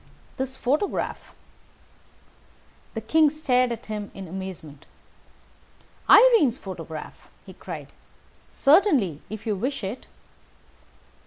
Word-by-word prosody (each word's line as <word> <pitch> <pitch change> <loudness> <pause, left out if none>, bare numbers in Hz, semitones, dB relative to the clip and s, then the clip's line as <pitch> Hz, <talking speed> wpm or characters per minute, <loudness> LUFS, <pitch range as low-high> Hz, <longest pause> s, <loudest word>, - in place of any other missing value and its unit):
"This 265 0 -4
photograph!" 295 +11 -2 1.6
The 225 - -3
King 310 +7 +4
stared 255 -5 +1
at 235 - -6
him 210 -1 -5
in 195 -1 -8
amazement. 175 -5 -8 1.2
"Irene's 410 - +7
photograph!" 165 -5 -9 0.2
he - - -11
cried. - - -8 0.6
"Certainly, 275 - +3
if 215 +2 -7
you 215 -2 0
wish 245 +5 -3
it." 200 +6 -5
235 Hz, 95 wpm, -25 LUFS, 190-290 Hz, 1.6 s, Irene's